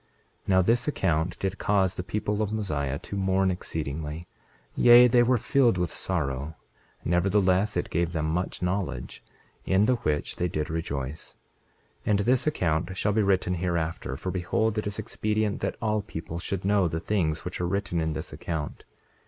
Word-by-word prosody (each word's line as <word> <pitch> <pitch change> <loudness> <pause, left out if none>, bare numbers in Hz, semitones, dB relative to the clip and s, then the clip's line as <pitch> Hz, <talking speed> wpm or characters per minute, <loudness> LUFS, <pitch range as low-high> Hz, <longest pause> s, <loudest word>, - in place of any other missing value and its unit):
28:18 - - -39 0.4
Now 95 -1 +5
this 115 +6 +2
account 90 - 0
did 95 +1 -2
cause 95 -3 +2
the 90 - -4
people 105 +2 -2
of 105 -1 -1
Mosiah 75 -11 -1
to 100 - -7
mourn 95 -1 +2
exceedingly, 80 -2 -4 0.5
yea, 120 0 +8
they 120 0 +5
were 125 +1 +4
filled 120 -2 +3
with 90 -1 -2
sorrow; 75 -4 -2 0.5
nevertheless 95 +2 +2
it 90 - -2
gave 85 +1 0
them 80 -2 -1
much 90 +3 -2
knowledge, 90 -9 -3 0.4
in 95 +2 +3
the 125 +2 +2
which 75 -8 -2
they 90 - 0
did 75 -2 -3
rejoice. 75 -2 -4 0.7
28:19 - - +1
And 100 -1 +3
this 125 +7 +2
account 90 - 0
shall 105 +2 +1
be 110 - +3
written 95 -2 +2
hereafter; 85 -6 -2
for 95 - -4
behold, 105 +4 0
it 105 - -3
is 100 - -3
expedient 110 0 -1
that - - -2
all 110 -2 0
people 85 -3 -6
should 95 +1 -3
know 100 -2 +3
the 80 0 -2
things 80 -5 -1
which 90 0 -4
are 90 - 0
written 95 -2 -1
in 80 -1 -1
this - - -5
account. 80 -3 -5
95 Hz, 175 wpm, -27 LUFS, 80-105 Hz, 0.7 s, yea